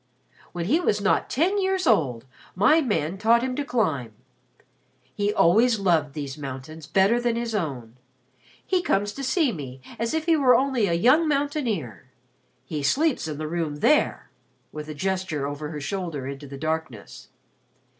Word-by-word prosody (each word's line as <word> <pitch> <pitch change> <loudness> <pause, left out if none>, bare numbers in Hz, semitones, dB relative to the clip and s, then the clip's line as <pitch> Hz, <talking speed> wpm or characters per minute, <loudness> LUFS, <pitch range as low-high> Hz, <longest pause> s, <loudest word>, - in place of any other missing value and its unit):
When 175 -1 -4
he 290 - +2
was 210 - +1
not 205 +1 +1
ten 365 +9 +1
years 380 -1 0
old, 130 - +2 0.3
my 215 - +4
man 190 - -1
taught 230 +3 +4
him 255 -1 -2
to 290 - -2
climb. 155 - -1 1.0
He 205 +5 0
always 225 +6 +4
loved 165 -8 +1
these 145 -1 -5
mountains 140 +3 -8
better 200 +8 +3
than 240 -1 0
his 235 -1 -3
own. 130 - -4 0.7
He 370 -2 +1
comes 205 - 0
to 275 - -7
see 275 +1 +2
me 135 - -7 0.2
as 230 +6 -1
if 320 0 -1
he 330 -1 +4
were 260 -5 +5
only 260 -5 +2
a 170 - 0
young 260 - +4
mountaineer. 255 - -2 0.6
He 150 -2 -4
sleeps 275 - +1
in 150 -2 -5
the 155 0 -4
room 160 -2 -2
there," 295 - +1 0.4
with 150 0 -7
a 155 - -6
gesture 185 -3 -2
over 145 +1 -5
her 150 -1 -6
shoulder 165 -3 -4
into 140 +1 -7
the 140 0 -8
darkness. 155 -7 -5
190 Hz, 165 wpm, -25 LUFS, 150-250 Hz, 1.0 s, were